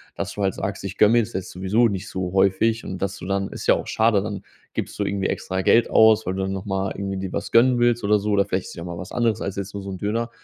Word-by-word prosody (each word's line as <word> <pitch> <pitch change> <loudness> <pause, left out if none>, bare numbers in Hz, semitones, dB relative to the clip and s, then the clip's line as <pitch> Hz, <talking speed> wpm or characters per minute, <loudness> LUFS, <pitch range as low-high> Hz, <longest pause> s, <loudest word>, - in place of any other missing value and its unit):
dass 100 0 -4
du 105 - -5
halt 95 -2 +1
sagst: - - -4
„Ich 95 -1 -6
gönne 105 +1 +5
mir - - +5
jetzt 115 0 -2
jetzt 95 0 -4
sowieso 95 +6 +2
nicht 100 -2 -4
so 95 -1 -4
häufig“ 100 +4 +2
und 95 - -6
dass 100 0 -2
du - - -9
dann 100 +1 -1
ist - - -7
ja - - +6
auch - - -5
schade, 110 -2 +2
dann 100 -1 -5 0.3
gibst - - -5
du 105 - +1
irgendwie 100 -1 -1
extra 95 0 -2
Geld 115 +5 +4
aus, 110 0 +5
weil 95 - -1
du 95 - -3
dann 95 - -2
noch 95 +1 -5
mal 95 -1 -1
irgendwie 100 0 -4
dir 95 -1 -4
was - - -4
gönnen 120 +1 +5
willst 120 -1 +2
oder 105 +1 +3
so 105 +1 -2
oder 100 -1 +4
vielleicht 95 0 -2
ist - - -8
es - - -11
ja 85 - -7
auch - - -7
mal 85 -1 -6
was 90 +1 -8
anderes 115 -3 +1
als 100 - -3
jetzt 100 0 -5
nur 100 -1 -6
so 100 - -7
'n 95 - -5
Döner 115 +5 -2
100 Hz, 315 wpm, -23 LUFS, 95-110 Hz, 0.3 s, ja